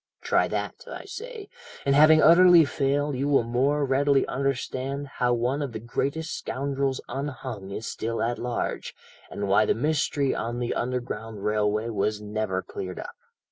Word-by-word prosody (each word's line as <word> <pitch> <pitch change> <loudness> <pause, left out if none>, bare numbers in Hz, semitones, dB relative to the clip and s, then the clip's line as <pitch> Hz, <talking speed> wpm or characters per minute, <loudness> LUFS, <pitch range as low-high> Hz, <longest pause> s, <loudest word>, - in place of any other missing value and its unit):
"Try - - +2
that, 475 - -4
I - - -7
say, 450 -2 -8 0.4
and 140 - +3
having 155 +2 +7
utterly 170 0 +8
failed 140 0 0
you 135 +3 -1
will 140 -4 +3
more 135 +5 +1
readily 140 +1 +3
understand 135 +1 -2
how 125 -3 -1
one 125 +5 0
of 140 -5 -4
the 110 - -4
greatest 140 +7 -2
scoundrels 135 0 -2
unhung 130 -7 -5
is 105 +3 -5
still 115 +1 -3
at 120 +1 -1
large, 120 0 -3 0.3
and 100 - -4
why 100 +2 +4
the - - +2
mystery 145 +1 0
on 120 +2 -3
the 120 -1 -1
Underground 115 -4 -4
Railway 105 +1 +1
was 105 -1 -1
never 105 -3 -2
cleared 90 -1 -6
up. - - -7
130 Hz, 160 wpm, -26 LUFS, 115-145 Hz, 0.4 s, utterly